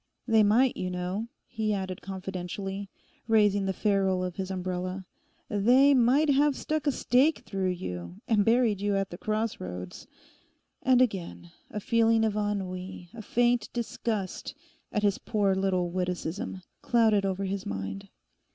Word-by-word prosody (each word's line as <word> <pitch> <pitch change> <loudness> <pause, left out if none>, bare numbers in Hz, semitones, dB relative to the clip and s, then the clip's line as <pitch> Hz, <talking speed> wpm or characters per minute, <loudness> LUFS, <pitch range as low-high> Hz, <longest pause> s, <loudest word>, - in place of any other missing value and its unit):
They 225 -1 +5
might, 230 +5 +4
you 185 - -3
know,' 180 +5 -3 0.2
he 215 -3 -1
added 190 -2 -4
confidentially, 195 +1 -5 0.4
raising 205 -3 +3
the - - +1
ferrule 190 -2 +1
of 180 -1 -4
his 190 -1 -3
umbrella, 185 0 -3 0.4
'they 250 +7 +5
might 270 +4 +4
have 285 +1 +3
stuck 310 +2 -2
a - - +5
stake 270 +4 +2
through 190 -2 -1
you, 90 - -5
and 215 -3 +3
buried 225 -3 +3
you 205 0 +1
at 195 -1 -1
the 175 - -8
crossroads.' 90 - -4 0.7
And 255 0 +5
again, 180 -6 -4 0.2
a 210 - -4
feeling 225 +1 +3
of 215 -2 0
ennui, 190 -4 -3
a 230 - -8
faint 240 +1 +1
disgust 225 -4 -3 0.4
at 210 - -1
his 200 -2 +2
poor 205 -3 +1
little 185 -2 0
witticism, 180 +1 -3 0.2
clouded 220 -4 +3
over 195 0 -1
his 195 0 -3
mind. 95 0 -5
200 Hz, 145 wpm, -28 LUFS, 185-225 Hz, 0.7 s, They